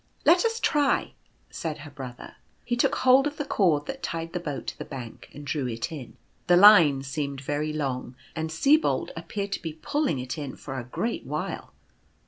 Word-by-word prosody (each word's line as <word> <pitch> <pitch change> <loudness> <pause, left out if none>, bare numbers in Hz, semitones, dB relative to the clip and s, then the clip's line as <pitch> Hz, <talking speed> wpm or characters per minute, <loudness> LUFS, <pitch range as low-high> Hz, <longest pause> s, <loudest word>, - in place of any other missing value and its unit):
" - - -34
Let 350 +5 +6
us 455 0 0
try," 290 -9 +1 0.4
said 160 -2 -4
her 145 - -10
brother. 130 -3 -9 0.3
He 240 - 0
took 240 - +2
hold 260 +2 +5
of 295 - -6
the 290 - -2
cord 160 - +2
that 270 - -6
tied 165 0 -4
the 180 - -1
boat 150 -5 -5
to - - -5
the - - -3
bank, 125 -5 -9
and 145 +1 -10
drew 140 -2 -1
it 115 +3 -4
in. 140 -7 -8 0.3
The 175 0 +6
line 170 -9 +8
seemed 140 0 -3
very 145 +3 -2
long, 135 -4 -3 0.2
and 160 0 -2
Sibold 280 - +2
appeared 200 -1 -4
to - - -2
be 165 -3 -5
pulling 285 - -1
it 125 +4 -4
in 140 -3 -5
for 135 -2 -6
a - - -5
great 225 - -3
while. - - -4
155 Hz, 200 wpm, -26 LUFS, 135-220 Hz, 0.4 s, line